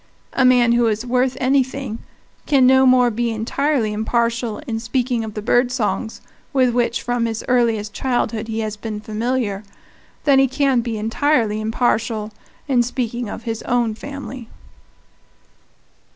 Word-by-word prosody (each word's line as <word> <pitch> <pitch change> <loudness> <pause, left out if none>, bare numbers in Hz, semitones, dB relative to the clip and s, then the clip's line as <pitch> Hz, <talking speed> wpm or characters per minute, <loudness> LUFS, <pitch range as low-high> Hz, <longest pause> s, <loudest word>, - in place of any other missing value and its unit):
A 265 - +2
man 250 -2 +5
who 235 0 +3
is 220 +2 -1
worth 250 +1 +1
anything 260 -2 0 0.5
can 275 -4 +4
no 265 +1 +6
more 250 -1 +5
be 235 +2 -1
entirely 230 +1 0
impartial 230 +1 -1
in 225 -5 -3
speaking 245 0 -1
of 215 -1 -7
the 210 - -4
bird 245 +2 +2
songs 230 -2 -2 0.3
with 255 -3 +3
which 240 -1 0
from 245 -1 0
his 225 -1 -4
earliest 230 -4 +1
childhood 235 -3 -1
he 225 0 -2
has 215 -1 -3
been 215 0 -5
familiar 220 -1 -2 0.6
than 280 -2 +5
he 270 - +5
can 265 -1 +1
be 230 -1 -4
entirely 225 -1 +1
impartial 220 -1 0 0.4
in 255 -4 +3
speaking 240 -1 -3
of 225 - -7
his 225 -1 -4
own 240 -2 0
family. 265 -1 -8
240 Hz, 150 wpm, -20 LUFS, 220-255 Hz, 0.6 s, no